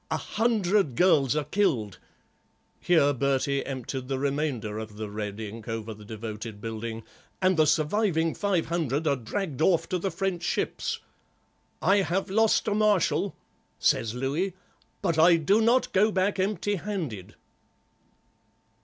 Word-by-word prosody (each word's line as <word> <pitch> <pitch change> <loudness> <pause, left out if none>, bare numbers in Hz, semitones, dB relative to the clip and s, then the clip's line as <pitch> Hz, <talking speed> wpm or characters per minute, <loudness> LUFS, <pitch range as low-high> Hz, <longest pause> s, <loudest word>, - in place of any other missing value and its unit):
A - - 0
hundred 210 - +1
girls 145 -5 +4
are 150 - +1
killed"—here 145 - -1
Bertie 140 +1 0
emptied 130 -1 -5
the 135 0 -1
remainder 135 -6 -2
of 110 -1 -8
the 105 -1 -5
red 105 0 -5
ink 110 +1 -7
over 115 -1 -4
the 105 0 -13
devoted 110 0 -7
building—"and 115 - -3
the 155 -2 +4
surviving 165 +1 +1
five 195 -5 0
hundred 160 -3 -1
are 145 -2 +3
dragged 150 - -4
off 170 0 +3
to 180 - 0
the 195 - -1
French 185 0 -2
ships. 175 - -2 0.8
'I 195 - +4
have 190 0 0
lost 220 +2 +3
a 210 - +2
Marshal,' 210 -4 +2 0.4
says 115 0 +1
Louis, 150 +9 -1 0.5
'but 170 -4 +1
I 170 +2 +7
do 195 +7 +3
not 240 +3 +2
go 210 +3 +4
back 195 +1 0
empty 205 +1 0
handed. 165 - -5
155 Hz, 135 wpm, -27 LUFS, 115-190 Hz, 0.8 s, I